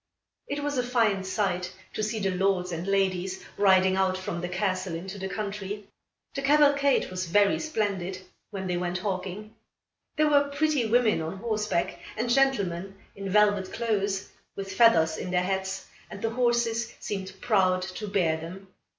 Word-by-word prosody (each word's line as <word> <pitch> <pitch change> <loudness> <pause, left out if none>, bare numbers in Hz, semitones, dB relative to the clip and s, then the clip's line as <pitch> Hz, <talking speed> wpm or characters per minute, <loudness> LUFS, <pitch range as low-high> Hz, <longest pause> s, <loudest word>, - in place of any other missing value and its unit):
It 285 0 -3
was 290 -2 -1
a - - +1
fine 225 -6 +2
sight 190 -2 -1 0.2
to - - -3
see 215 +1 -1
the 195 -2 0
lords 185 -1 +1
and 170 +2 -4
ladies 190 -1 0
riding 190 -1 +4
out 190 -1 +1
from 175 -2 -4
the 175 - -3
castle 185 -1 -1
into 190 +4 -6
the 190 0 -4
country. 205 -1 -5 0.5
The 275 - -3
cavalcade 280 -4 +4
was 185 -1 -3
very 200 +3 +3
splendid, 200 - -2 0.3
when 195 -3 -5
they 180 -1 -1
went 175 0 -1
hawking. 195 +2 -4 0.6
There 305 0 +4
were 285 -1 +4
pretty 285 -4 +1
women 225 -5 +3
on 160 +4 -4
horseback, 210 -4 -1 0.2
and 235 +2 0
gentlemen 195 -9 +1 0.2
in 195 -1 -5
velvet 205 -1 +3
clothes, 200 -4 -1 0.3
with 195 -1 -5
feathers 165 -8 +5
in - - -5
their 180 0 +1
hats, 190 0 -2 0.2
and 200 - -8
the 225 +2 -1
horses 235 -1 +1
seemed 190 -2 -4
proud 185 -5 +2
to 185 +3 -5
bear 180 -6 +1
them. 185 +4 -9
195 Hz, 165 wpm, -27 LUFS, 185-225 Hz, 0.6 s, feathers